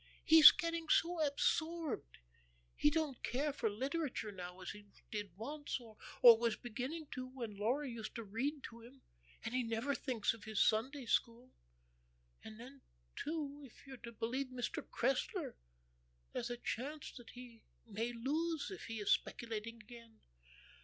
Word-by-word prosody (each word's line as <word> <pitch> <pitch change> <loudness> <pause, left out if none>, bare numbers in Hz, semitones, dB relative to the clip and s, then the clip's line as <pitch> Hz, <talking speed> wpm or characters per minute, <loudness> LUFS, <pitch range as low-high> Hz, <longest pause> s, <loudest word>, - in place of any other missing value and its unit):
He's 315 -2 +12
getting 335 -1 -2
so 345 -1 +3
absorbed. 310 - 0 0.6
He 295 - +5
don't 300 -4 -1
care 280 +4 0
for 230 -5 0
literature 265 0 -2
now 180 -1 -8
as - - -4
he 205 0 -12 0.2
did 205 -4 -5
once, 290 +6 -4
or 225 -3 -13 0.3
was 235 -1 +8
beginning 255 +7 -5
to 255 -1 -4
when 240 -5 -6
Laura 245 +8 0
used 230 -3 -6
to 230 - -4
read 265 +8 -2
to 230 +1 -9
him; 255 +3 -15 0.4
and 225 - -3
he 255 - +2
never 230 +4 -1
thinks 245 -7 0
of 225 - -12
his 220 -2 -2
Sunday 255 +5 +2
school. 235 +2 0 0.9
And 220 0 -10
then, 265 +3 -11 0.3
too, 295 -2 -3
if 265 0 -14
you're 270 -1 -8
to 235 -1 -9
believe 240 +4 -2
Mr. 255 -1 -3
Cressler, 255 +2 -1 0.8
there's 240 - -2
a 240 - -3
chance 280 +6 -4
that 240 -2 -11
he 245 -2 -11 0.2
may 225 +2 -2
lose 300 +8 -1
if 390 - -7
he 225 - -5
is 205 - +1
speculating 230 -1 -1
again." 230 -1 -14
245 Hz, 155 wpm, -37 LUFS, 225-285 Hz, 0.9 s, He's